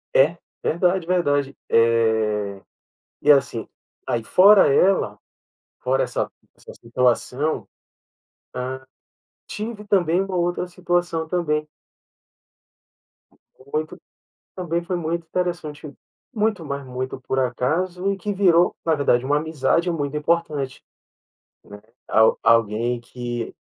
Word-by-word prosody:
É, -, -, +4 dB, 0.3 s
verdade, 175 Hz, +1 st, +1 dB
verdade, 145 Hz, -6 st, +1 dB
eh, 110 Hz, -3 st, +2 dB, 0.6 s
e 150 Hz, -, +4 dB
assim, 135 Hz, -5 st, +3 dB, 0.4 s
aí 115 Hz, -1 st, -2 dB
fora 195 Hz, -, +7 dB
ela 180 Hz, -, +3 dB, 0.6 s
fora, 130 Hz, +1 st, +1 dB
essa -, -, -2 dB, 0.3 s
essa -, -, -13 dB
situação, 125 Hz, +5 st, 0 dB, 0.8 s
ah, 130 Hz, +1 st, -5 dB, 0.6 s
tive 210 Hz, 0 st, -6 dB
também 180 Hz, -4 st, +2 dB
uma 195 Hz, -1 st, -4 dB
outra 175 Hz, 0 st, 0 dB
situação 175 Hz, -2 st, -1 dB
também. 150 Hz, -3 st, -1 dB, 2.1 s
Muito 155 Hz, +1 st, -3 dB, 0.6 s
também 170 Hz, -2 st, -2 dB
foi 180 Hz, +1 st, -2 dB
muito 170 Hz, 0 st, -3 dB
interessante, 165 Hz, -4 st, -3 dB, 0.4 s
muito 210 Hz, -5 st, 0 dB
mais 140 Hz, -1 st, -5 dB
muito 130 Hz, +1 st, -5 dB
por 130 Hz, +1 st, -2 dB
acaso, 175 Hz, +10 st, 0 dB
e -, -, -3 dB
que 205 Hz, +3 st, -3 dB
virou, 180 Hz, -3 st, +4 dB
na 165 Hz, -, +2 dB
verdade, 130 Hz, -4 st, +2 dB
uma 145 Hz, +2 st, +2 dB
amizade 160 Hz, +3 st, 0 dB
muito 150 Hz, -3 st, -2 dB
importante, 150 Hz, -4 st, -1 dB, 0.8 s
né, 105 Hz, 0 st, -12 dB, 0.3 s
al 110 Hz, 0 st, +4 dB
alguém 115 Hz, +1 st, +2 dB
que, 120 Hz, -1 st, -6 dB
150 Hz, 110 wpm, -22 LUFS, 125-175 Hz, 2.1 s, fora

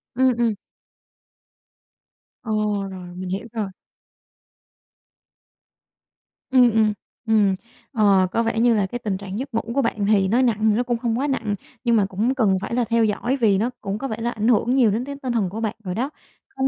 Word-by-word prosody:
Ừm, 260 Hz, +1 st, +4 dB
ừm. 230 Hz, -2 st, +2 dB, 1.9 s
Ồ, 220 Hz, -, -5 dB, 0.4 s
rồi, 180 Hz, -1 st, -9 dB
mình 185 Hz, 0 st, -6 dB
hiểu 195 Hz, +5 st, -4 dB
rồi. 215 Hz, -3 st, -2 dB, 2.8 s
Ừm, 250 Hz, -3 st, +6 dB
ừm, 215 Hz, -1 st, +3 dB, 0.3 s
ừm, 205 Hz, -3 st, +3 dB, 0.4 s
ờ, 200 Hz, -6 st, +4 dB
có 230 Hz, -, +1 dB
vẻ 225 Hz, 0 st, -1 dB
như 240 Hz, 0 st, +4 dB
là 205 Hz, -2 st, +2 dB
cái 245 Hz, +6 st, -5 dB
tình 205 Hz, -5 st, -2 dB
trạng 195 Hz, +2 st, -6 dB
giấc 270 Hz, -2 st, -6 dB
ngủ 225 Hz, -, +1 dB
của 275 Hz, -, +2 dB
bạn 215 Hz, -4 st, -1 dB
thì 200 Hz, -2 st, +3 dB
nói 240 Hz, +6 st, +3 dB
nặng 235 Hz, -4 st, +2 dB
thì -, -, +2 dB
nó 245 Hz, -, +1 dB
cũng 240 Hz, -1 st, -1 dB
không 235 Hz, 0 st, -1 dB
quá 285 Hz, -, 0 dB
nặng 225 Hz, -6 st, -1 dB, 0.3 s
nhưng 235 Hz, -1 st, +3 dB
mà 205 Hz, -3 st, +3 dB
cũng 215 Hz, +7 st, -1 dB
cần 210 Hz, -7 st, +2 dB
phải 210 Hz, -, -4 dB
là 245 Hz, -, +2 dB
theo 230 Hz, 0 st, +2 dB
dõi 235 Hz, +5 st, 0 dB
vì 215 Hz, -6 st, +3 dB
nó 225 Hz, +5 st, 0 dB
cũng 200 Hz, -1 st, -3 dB
có 270 Hz, -, -4 dB
vẻ 220 Hz, -3 st, -4 dB
là 235 Hz, +1 st, -1 dB
ảnh 215 Hz, +1 st, -2 dB
hưởng 245 Hz, +1 st, +3 dB
nhiều 240 Hz, -6 st, +4 dB
đến 230 Hz, +5 st, -1 dB
cái 280 Hz, 0 st, -6 dB
tinh 250 Hz, -2 st, -2 dB
thần 205 Hz, -6 st, 0 dB
của 215 Hz, +4 st, -6 dB
bạn 220 Hz, -1 st, -2 dB
rồi 180 Hz, -1 st, -4 dB
đó. 260 Hz, +5 st, -1 dB, 0.5 s
Không 265 Hz, 0 st, +1 dB
225 Hz, 205 wpm, -22 LUFS, 205-245 Hz, 2.8 s, Ừm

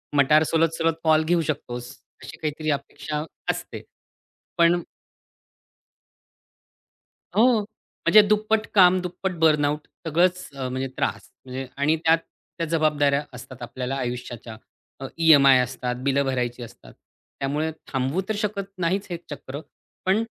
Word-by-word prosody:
मटार 150 Hz, +3 st, +5 dB
सोलत-सोलत 165 Hz, +1 st, +1 dB
कॉल 155 Hz, 0 st, +4 dB
घेऊ 170 Hz, +1 st, +2 dB
शकतोस 125 Hz, -5 st, -4 dB, 0.3 s
अशी -, -, -9 dB
काहीतरी 155 Hz, 0 st, -3 dB
अपेक्षा 145 Hz, +1 st, -4 dB, 0.3 s
असते. -, -, -7 dB, 0.8 s
पण 170 Hz, +1 st, +4 dB, 2.5 s
हो. 235 Hz, +1 st, +5 dB, 0.5 s
म्हणजे 215 Hz, -, +9 dB
दुप्पट 215 Hz, +1 st, +1 dB
काम. 185 Hz, -1 st, +7 dB
दुप्पट 185 Hz, +1 st, -3 dB
बर्नआउट. 150 Hz, -2 st, +2 dB, 0.2 s
सगळंच 180 Hz, +3 st, +1 dB
अ, 130 Hz, -2 st, -3 dB
म्हणजे 130 Hz, +1 st, -2 dB
त्रास -, -, -2 dB, 0.2 s
म्हणजे. 130 Hz, +1 st, -6 dB
आणि 145 Hz, +3 st, +2 dB
त्यात 165 Hz, 0 st, +5 dB, 0.4 s
त्या 165 Hz, -, -1 dB
जबाबदाऱ्या 150 Hz, -3 st, +2 dB
असतात 125 Hz, 0 st, -11 dB
आपल्याला 125 Hz, +2 st, -4 dB
आयुष्याच्या. 120 Hz, -3 st, -5 dB, 0.4 s
अ, 135 Hz, -, -6 dB
ई-एम-आय 140 Hz, -5 st, +7 dB
असतात, 125 Hz, 0 st, -2 dB
बिलं 140 Hz, 0 st, +2 dB
भरायची 125 Hz, -2 st, -2 dB
असतात. -, -, -13 dB, 0.5 s
त्यामुळे 150 Hz, +3 st, -1 dB, 0.2 s
थांबवू 135 Hz, +7 st, 0 dB
तर 215 Hz, -, 0 dB
शकत 200 Hz, -2 st, -3 dB
नाहीच 185 Hz, +3 st, -1 dB
हे 175 Hz, -, -3 dB
चक्र. 140 Hz, -1 st, -7 dB, 0.5 s
पण 195 Hz, +4 st, +3 dB
150 Hz, 125 wpm, -24 LUFS, 135-170 Hz, 2.5 s, म्हणजे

